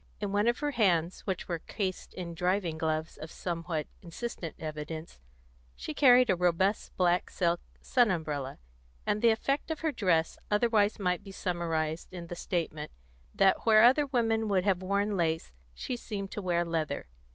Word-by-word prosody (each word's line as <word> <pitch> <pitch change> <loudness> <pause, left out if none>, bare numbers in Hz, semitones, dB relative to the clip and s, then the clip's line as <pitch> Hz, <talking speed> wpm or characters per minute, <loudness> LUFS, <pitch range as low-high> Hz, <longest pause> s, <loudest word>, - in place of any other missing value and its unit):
In 205 -2 -2
one 205 +2 +2
of 240 +1 +3
her 295 0 0
hands, 180 - +1
which 190 -2 -2
were 170 -2 -2
cased 190 +1 -4
in 175 -2 -5
driving 180 0 0
gloves 160 0 -1
of 155 - -8
somewhat 165 -3 -3 0.2
insistent 175 -1 -6
evidence, 155 - -6 0.6
she - - -6
carried 250 -5 +6
a - - +3
robust 180 +3 +1
black 180 -1 +2
silk 170 -2 0 0.2
sun 245 -3 +3
umbrella, 150 -7 -2 0.5
and 210 0 0
the 235 - +6
effect 275 +8 0
of 320 - -3
her 320 -1 +1
dress 170 - +1
otherwise 210 -1 +3
might 180 -3 -1
be 195 - -10
summarised 165 -4 -2
in 175 -2 -7
the 175 - -6
statement 160 -4 -3 0.5
that 195 -1 +4
where 215 -1 +7
other 270 +5 +6
women 225 -4 +1
would 190 -3 +2
have 190 -2 +1
worn 200 +2 0
lace, 165 - 0 0.2
she 250 - -4
seemed 200 -4 -5
to 210 - -4
wear 175 -2 +1
leather. 160 -4 -2
185 Hz, 170 wpm, -30 LUFS, 165-215 Hz, 0.6 s, where